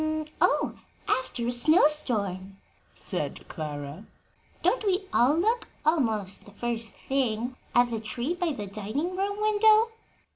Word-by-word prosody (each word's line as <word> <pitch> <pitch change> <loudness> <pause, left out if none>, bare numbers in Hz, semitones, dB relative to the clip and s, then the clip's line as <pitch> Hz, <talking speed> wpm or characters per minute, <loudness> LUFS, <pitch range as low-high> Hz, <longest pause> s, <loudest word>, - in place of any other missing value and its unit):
"After 255 -2 -1
a - - +1
snow 310 +8 +5
storm," 200 -10 +1 0.3
said - - -4
Clara. 150 +3 -6 0.6
"Don't - - +2
we 390 -1 +1
all 255 +5 +4
look, 450 +7 +1 0.2
almost 225 - +1
the - - -13
first 230 +2 -3
thing, 250 -2 -1 0.2
at 240 0 +4
the 225 - -2
tree 240 +8 -3
by 355 -2 -1
the 210 -8 -5
dining 215 - -3
room 400 +2 -2
window?" 430 +1 +4
245 Hz, 130 wpm, -27 LUFS, 215-350 Hz, 0.6 s, snow